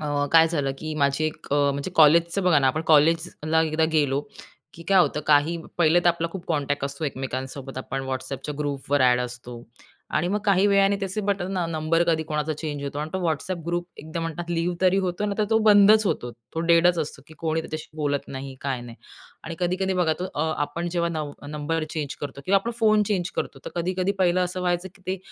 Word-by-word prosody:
अ, 145 -1 -1
काय 165 0 +7
झालं 145 -5 -1
की 155 +1 -5
माझी 140 +2 +1
एक 155 0 -4
अ, - - +3 0.2
म्हणजे 140 +6 -4
कॉलेजचं 170 +4 +5
बघा 180 -5 +4
ना, 135 - +2
आपण 155 +5 +1
कॉलेजला 160 +1 +3
एकदा 160 0 +1
गेलो 145 -3 +2 0.5
की 165 - -11
काय 195 -1 +5
होतं 150 - +1
काही 150 +3 +4 0.2
पहिले 170 +1 +4
तर - - +6
आपला 170 0 0
खूप 190 -3 -7
कॉन्टॅक्ट 145 -3 -1
असतो 140 +3 -4
एकमेकांसोबत 135 0 -5
आपण 135 +1 -4
WhatsAppच्या 130 +3 -4
ग्रुपवर 145 -1 -1
ॲड 125 -1 +4
असतो 125 -1 -7 0.5
आणि 175 +3 +1
मग 205 +3 0
काही 200 -1 +4
वेळाने 200 0 +4
त्याचे 195 +2 -2
बटन 195 -2 -1
अ, 175 - 0
नंबर 165 +1 +1
कधी 160 -2 +2
कोणाचा 150 0 -2
चेंज 150 -2 -5
होतो 140 +1 -4
आणि 155 +1 -4
तो 190 - -1
WhatsApp 165 +3 -3
ग्रुप 175 0 -2
एकदा 160 +2 -5
म्हणतात 165 +1 -5
लिव्ह 170 +1 0
तरी 185 0 +4
होतो 185 +1 -1
ना, 205 - -1
तर 215 - +3
तो 220 - +4
बंदच 210 +1 +7
होतो. 120 -9 -1
तो 120 +8 -8
डेडच 170 +1 +5
असतो 150 -3 -4
की 160 - -14
कोणी 160 0 -1
त्याच्याशी 155 -1 -7
बोलत 145 -2 -2
नाही 135 0 -7
काय 135 -3 -2
नाही. 120 -1 -10 0.5
आणि 165 - -5
कधी-कधी 185 +2 0
बघा 175 -3 +2
तो - - -1
अ, 150 - 0 0.2
आपण 165 +4 -3
जेव्हा 170 0 0
नव 155 -3 -4 0.2
नंबर 150 +2 -2
चेंज 150 -4 -4
करतो 140 -1 -6
किंवा 195 - +4
आपण 230 - -3
फोन 215 -1 +4
चेंज 180 -3 -1
करतो. 135 - -3
तर - - -6
कधी-कधी 185 +2 0
पाहिलं 180 -1 +3
असं 180 +1 -4
व्हायचं 180 0 -1
की 190 - -23
ते 190 +1 -2
160 Hz, 215 wpm, -24 LUFS, 145-180 Hz, 0.5 s, काय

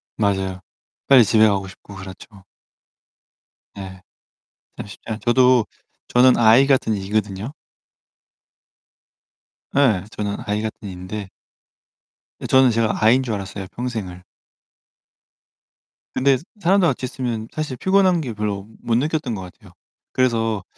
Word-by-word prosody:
맞아요. 95 -3 -1 0.5
빨리 130 -4 +7
집에 110 +1 +5
가고 100 -2 0
싶고 100 +2 -13
그렇죠. 95 +1 -12 1.3
네. 95 -2 -9 0.8
참 - - -7
쉽지 100 - -13
않 110 -1 -4
저도 125 -1 +4 0.4
저는 125 +1 +5
I 120 +4 +6
같은 130 -5 +2
E거든요. 105 +4 -3 2.2
예, 115 -10 +3
저는 105 -2 -4
I 105 +1 -1
같은 110 -1 -6
E인데 95 +2 -7 1.1
예 - - -6
저는 130 -1 +5
제가 115 -1 0
I인 125 +4 +5
줄 115 - -3
알았어요, 100 -1 -5
평생을. 110 -8 -5 1.9
근데 135 0 +3 0.2
사람들 185 0 +3
같이 130 -2 -1
있으면 120 -4 -4
사실 150 -5 -4
피곤한 190 -1 +3
게 125 -5 -5
별로 105 -2 -4
못 115 - 0
느꼈던 145 -3 -1
것 95 - -6
같아요. 90 -1 -13 0.4
그래서 115 -5 0
110 Hz, 240 characters per minute, -21 LUFS, 100-130 Hz, 2.2 s, 빨리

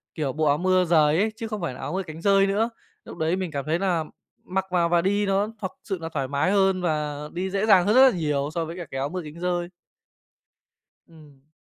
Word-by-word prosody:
kiểu, 145 -5 -2
bộ 155 0 0
áo 145 0 +3
mưa 185 0 +2
rời 155 -2 +4
ấy 215 +2 +1
chứ 225 0 -5
không 215 -3 -5
phải 160 -7 -3
là - - -11
áo - - -5
mưa 190 0 -1
cánh 160 -1 -9
dơi 195 0 +4
nữa. 215 +4 +1 0.4
Lúc - - -10
đấy 160 +2 0
mình 185 -4 -3
cảm 140 -1 -4
thấy 165 +3 0
là 180 -5 0 0.4
mặc 190 +1 -2
vào 170 -2 +2
và 170 -1 +3
đi 205 +2 +1
nó 195 +2 +1
thật 190 - -3
sự 195 -4 -3
là 165 - -4
thoải 140 -4 -3
mái 145 +6 0
hơn 190 -2 +2
và 150 -4 -1 0.2
đi 185 +2 -2
dễ 200 +2 0
dàng 190 -4 +5
hơn 210 +3 +2
rất 260 - +8
là 180 - -5
nhiều 145 -3 -1
so 165 -2 -1
với 165 +3 -7
cả 175 - -6
cái 135 - -4
áo 140 +2 -1
mưa 180 0 -4
cánh 155 +2 -10
dơi. 175 -1 -1 1.4
Ừm. 150 -4 -19
175 Hz, 255 wpm, -24 LUFS, 155-195 Hz, 1.4 s, rất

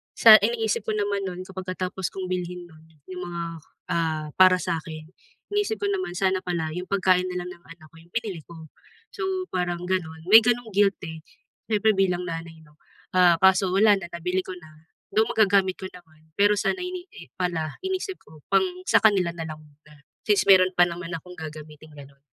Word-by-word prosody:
sa 220 -2 +9
iniisip 225 0 0
ko 220 - 0
naman 205 -1 -1
nun 180 0 -6
kapagka 185 -1 -5
tapos 190 0 -4
kong 190 -1 -5
bilhin 180 -1 -4
nun 160 -1 -18 0.3
'yong 180 -1 -6
mga, 170 -1 -5 0.5
ah, 160 -2 -1
para 185 -1 +7
sa'kin, 160 -2 -5 0.5
iniisip 415 +1 0
ko 405 - 0
naman 375 - -3
sana 190 -1 +1
pala 170 -3 -2
'yong 180 +1 -4
pagkain 185 -2 +2
na 180 - -3
lang 180 - -7
ng 170 - -31
anak 155 -2 -18
ko - - -22
'yong 170 +1 -23
binili 210 -8 -3
ko. 165 -2 -12 0.5
So 380 -4 -3
parang 175 -1 -2
ganun, 160 -4 -2
may 220 - +11
ganung 245 -1 0
guilt 200 -1 +3
eh, 160 -1 -8 0.5
siyempre 215 0 +3
bilang 180 -2 +1
nanay 165 -1 -7
'no, 150 0 -24 0.4
ah, 180 -2 +6
kaso 190 +1 +4
wala 205 +2 +5
na, 175 - -7
nabili 180 +2 -2
ko - - -8
na, 155 -1 -17 0.3
though 220 +2 +4
magagamit 195 -3 +3
ko 190 - -6
naman, 160 -3 -18
pero 205 +1 +5
sana, 370 - 0
eh, 360 - -3
hindi 360 - -10
pala 165 -4 -2
iniisip 380 0 -3
ko 155 0 -17
pang 195 - +4 0.2
sa - - +4
kanila 195 -5 +3
na 165 - -5
lang 155 -1 -8
muna, 150 0 -21 0.2
since 210 -2 +3
meron 185 -1 +7
pa 175 - +7
naman 170 0 -7
akong 180 +2 -10
gagamitin 155 0 -10
ganun. 140 -1 -14
180 Hz, 195 wpm, -25 LUFS, 165-200 Hz, 0.5 s, may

